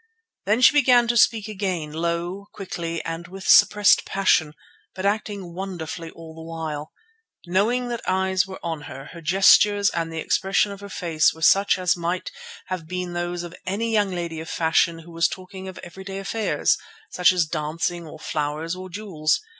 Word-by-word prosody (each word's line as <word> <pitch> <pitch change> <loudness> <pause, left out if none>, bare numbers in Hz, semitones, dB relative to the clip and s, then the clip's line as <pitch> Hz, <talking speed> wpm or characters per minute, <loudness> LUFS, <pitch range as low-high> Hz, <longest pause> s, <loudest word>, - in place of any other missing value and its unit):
Then 215 +4 +2
she 255 - +7
began 250 -4 +5
to 240 - +2
speak 220 -2 +4
again, 190 -7 -3
low, 170 +4 -3
quickly, 170 -4 -5
and 165 +1 -5
with 190 +1 -9
suppressed 210 -1 +6
passion, 160 -6 +1 0.4
but 190 - -4
acting 200 -3 -2
wonderfully 170 -3 -6
all 165 -1 -12
the 160 - -11
while. 160 -2 -5 0.5
Knowing 225 +8 +1
that 235 -1 -3
eyes 190 0 +1
were 190 - -8
on 165 -3 -3
her, 135 +1 -9
her 170 - -10
gestures 200 +4 +5
and 165 -1 -2
the 165 - -6
expression 195 +5 +1
of 200 - -8
her 200 - -9
face 165 -5 +1
were 160 - -8
such 195 +4 +5
as 180 -1 +2
might 175 +1 -3 0.3
have 185 -4 -5
been 180 0 -4
those 175 0 -3
of 175 0 -8
any 220 +5 -1
young 210 -3 +2
lady 170 -3 -4
of 160 - -7
fashion 165 +1 +2
who 170 - -13
was 165 -1 +2
talking 190 0 -8
of 185 -1 -8
everyday 190 +3 -8
affairs, 205 +3 0 0.3
such 180 0 +4
as 180 -2 +2
dancing, 165 +2 -3
or 155 - -10
flowers, 155 +2 -3
or 185 0 -8
jewels. 175 -5 -1
180 Hz, 180 wpm, -23 LUFS, 165-195 Hz, 0.5 s, she